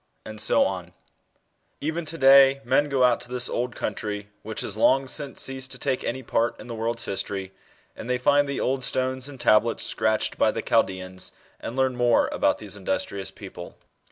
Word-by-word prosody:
and 110 0 -6
so - - +4
on. - - -4 0.9
Even 160 +3 -3
to 160 +2 -3
day 135 -1 +7
men 145 0 +2
go 135 -2 +2
out 125 -1 +3
to 120 - -9
this 125 0 0
old 125 0 -2
country, 105 -1 -4
which 110 0 -4
has 100 - -2
long 135 +4 +3
since 140 +1 0
ceased 135 0 -3
to - - -2
take 130 -2 -1
any 130 +2 -3
part 115 0 0
in - - -10
the 120 - -7
world's 115 +1 -2
history, 95 -1 -4 0.4
and 115 - -8
they 125 - +1
find 145 +3 +3
the 140 - -2
old 130 0 -1
stones 130 +1 -1
and 135 -3 -11
tablets 115 0 +3
scratched 110 0 -1
by - - +4
the - - -3
Chaldeans, 95 0 0 0.3
and 115 - -6
learn 130 -1 +1
more 120 -1 +3
about - - +1
these - - -8
industrious 95 -1 -3
psople. 95 -3 -10
125 Hz, 190 wpm, -25 LUFS, 110-135 Hz, 0.9 s, day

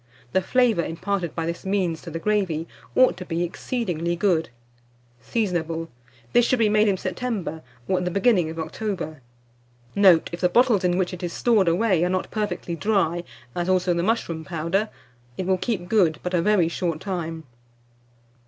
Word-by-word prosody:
The 190 - +2
flavour 230 -3 +2
imparted 180 +1 -3
by 165 - -2
this 170 +1 -4
means 190 -4 0
to 170 - -8
the 165 - -4
gravy, 175 -4 0 0.3
ought 255 -8 +5
to 180 - -6
be 170 -1 -2
exceedingly 175 -3 -2
good. 170 -3 +1 0.7
Seasonable. 165 - -2 0.4
This 240 - +6
should 255 +2 +2
be 225 -2 +3
made 215 +1 +4
in 195 -2 +2
September, 185 -4 -3 0.3
or 185 - +2
at 180 - -3
the - - +1
beginning 195 -3 +2
of 160 - -7
October. 160 -2 -4 0.7
Note. 185 -5 +5
If 170 - -5
the 180 - +3
bottles 230 -1 +4
in 180 0 +2
which 185 0 0
it 180 - -7
is 175 -1 -3
stored 220 -6 +3
away 180 0 +3
are 180 - +1
not 185 0 -2
perfectly 210 -5 -2
dry, 175 -3 +1 0.3
as, 175 +1 -2
also 180 -1 +2
the 170 - 0
mushroom 175 -6 -1
powder, 175 +6 -1 0.5
it 185 - -2
will 185 0 +1
keep 190 -6 -2
good 175 -7 +3
but 180 - -3
a 175 - +3
very 200 -3 +3
short 170 -1 -2
time. 165 -4 -4
180 Hz, 180 wpm, -24 LUFS, 170-205 Hz, 0.7 s, This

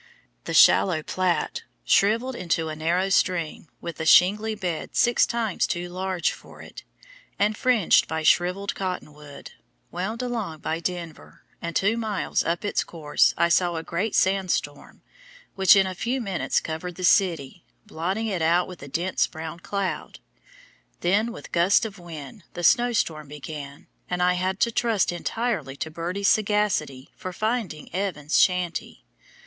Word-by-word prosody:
The - - -3
shallow 165 -5 +5
Platte, 180 -3 -1 0.2
shriveled 230 - +2
into 165 -5 -1
a 155 - -5
narrow 170 +5 0
stream 175 -4 0
with 170 -2 -7
a 160 - -2
shingly 210 +7 +5
bed 180 -6 -4
six 240 0 +4
times 230 -5 -1
too 175 +1 -3
large 185 -1 -1
for - - -13
it, - - -11 0.5
and 210 +2 +1
fringed 245 -6 +3
by 160 0 -3
shriveled 180 +5 +2
cotton 180 -5 -4
wood, 145 -1 -12 0.4
wound 220 +7 -3
along 225 -10 -3
by 160 - -2
Denver, 170 -2 -6 0.2
and 170 0 -5
two 205 +4 +2
miles 215 -4 -1
up 170 +4 -2
its 205 - 0
course 155 -3 +1
I 170 - +3
saw 175 +1 +2
a 160 - -4
great 190 +7 -2
sandstorm, 185 -6 -1 0.5
which 190 0 +6
in 195 -1 +4
a 185 - -3
few 235 +8 -2
minutes 195 -7 -1
covered 165 +2 -5
the 185 - -7
city, 170 -8 +2 0.2
blotting 190 +7 -3
it 195 -6 -2
out 170 +2 +3
with 180 -2 -10
a - - -8
dense 175 +6 0
brown 160 +1 -7
cloud. 200 +2 -4 0.8
Then 205 +6 +2
with 235 - -10
gusts 180 +6 +3
of 205 -3 -7
wind 165 +1 -10
the 175 - -5
snowstorm 170 - +2
began, 145 0 -8 0.2
and 180 0 0
I 180 0 +4
had 185 +2 -1
to 235 - +3
trust 225 -5 +1
entirely 210 - -3
to 160 +3 -5
Birdie's 180 +5 -2
sagacity 205 -12 +1
for 185 -3 -6
finding 215 -7 -3
Evans's 175 -6 0
shanty. 180 -2 -1
180 Hz, 155 wpm, -25 LUFS, 165-205 Hz, 0.8 s, which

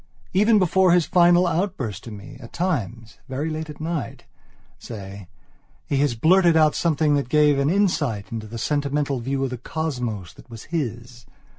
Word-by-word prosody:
Even 210 +4 +4
before 185 -1 +3
his 175 -3 +3
final 175 0 +4
outburst 165 - -2
to - - -7
me, 105 +6 -10
at 115 -3 -12
times, 120 - -3
very 145 +5 -3
late 155 0 -5
at 150 - -9
night, 160 -1 -4 0.6
say, 100 -4 -9 0.6
he 140 - -1
has 140 -3 +1
blurted 170 +6 +4
out 155 -1 +4
something 155 -2 +1
that 140 -3 0
gave 150 -1 +4
an 140 +1 +2
insight 155 - 0
into 110 -2 -5
the 115 +2 -7
sentimental 145 +1 -1
view 135 +3 -2
of 135 - -2
the 125 - -5
cosmos 125 - -4
that - - -18
was 115 -2 -10
his. 120 -7 -5
145 Hz, 170 wpm, -23 LUFS, 115-165 Hz, 0.6 s, Even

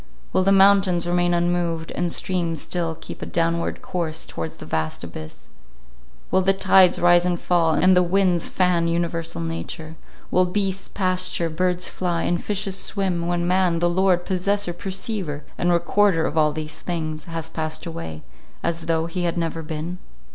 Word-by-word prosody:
Will - - +3
the 195 +1 +3
mountains 195 -3 +5
remain 175 0 +2
unmoved, 170 -2 0
and 175 -1 -1
streams 170 -4 -1
still 165 -1 -2
keep - - -9
a - - -3
downward 170 0 -1
course 165 -3 -2
towards 80 -1 -6
the - - -10
vast 80 +1 -2
abyss; 80 -2 -9 0.8
will 190 - +4
the 195 +1 +3
tides 190 -1 +5
rise 175 0 +5
and 175 -1 0
fall, 165 -3 +2
and 185 +3 +5
the 180 - +6
winds 180 -1 +2
fan 180 -2 +2
universal 165 - -2
nature; 85 - -5 0.4
will 185 - +4
beasts 195 +1 -1
pasture, 185 -3 0
birds 180 +2 0
fly, 175 -2 -1
and 175 0 0
fishes 195 -2 -2
swim, 185 -4 -1
when 175 0 0
man, 180 -2 +2
the 175 +1 +2
lord, 180 0 +2
possessor, 195 0 0
perceiver, 190 -4 -4
and 175 - +1
recorder 175 0 +3
of - - -3
all 155 -1 +4
these 155 0 -5
things, 155 -3 -4
has 165 -1 -5
passed 155 -1 -4
away, 80 - -6 0.4
as 165 -1 -2
though 165 -1 +1
he 175 +1 -3
had 170 0 -1
never 165 -1 -2
been? 160 +3 -5
175 Hz, 170 wpm, -23 LUFS, 165-185 Hz, 0.8 s, the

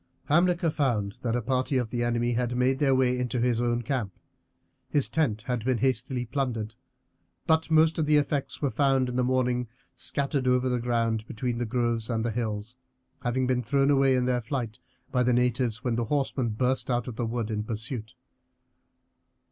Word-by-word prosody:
Hamilcar 170 +1 +3
found 115 -10 -1
that 115 -1 -1
a 120 - -1
party 130 +3 0
of 120 -3 -1
the 120 -1 -1
enemy 120 0 0
had 120 +1 -1
made 130 +2 +2
their 135 -2 +3
way 130 -1 +3
into 125 0 -1
his 120 -1 +1
own 120 0 0
camp. 115 -6 -3 0.7
His 145 -3 +3
tent 115 -10 0
had 125 -3 -2
been 130 0 +1
hastily 125 +1 0
plundered, 115 -4 -2 0.7
but 160 -1 +2
most 160 +1 +4
of 155 - +1
the 150 0 +5
effects 145 0 -1
were 140 - +1
found 135 -3 +2
in 125 - -4
the 125 - +2
morning 125 -1 +1 0.3
scattered 140 -2 -1
over 125 0 +2
the 125 -1 0
ground 115 -2 0
between 120 +1 -3
the 120 - -2
groves 120 -1 0
and 115 -1 -1
the 120 - 0
hills, 110 0 -4 0.4
having 125 +1 0
been 125 -1 +1
thrown 135 +4 +2
away 135 -1 +4
in 125 -1 +1
their 125 -1 +1
flight 115 -2 -4 0.3
by 125 - +2
the 125 0 +3
natives 125 -1 +1
when 120 -2 0
the 120 - 0
horsemen 135 -2 0
burst 125 +5 0
out 120 0 0
of 125 - -5
the 115 0 -2
wood 115 -1 -2
in 105 -1 -1
pursuit. 110 +1 -4
125 Hz, 190 wpm, -27 LUFS, 115-130 Hz, 0.7 s, the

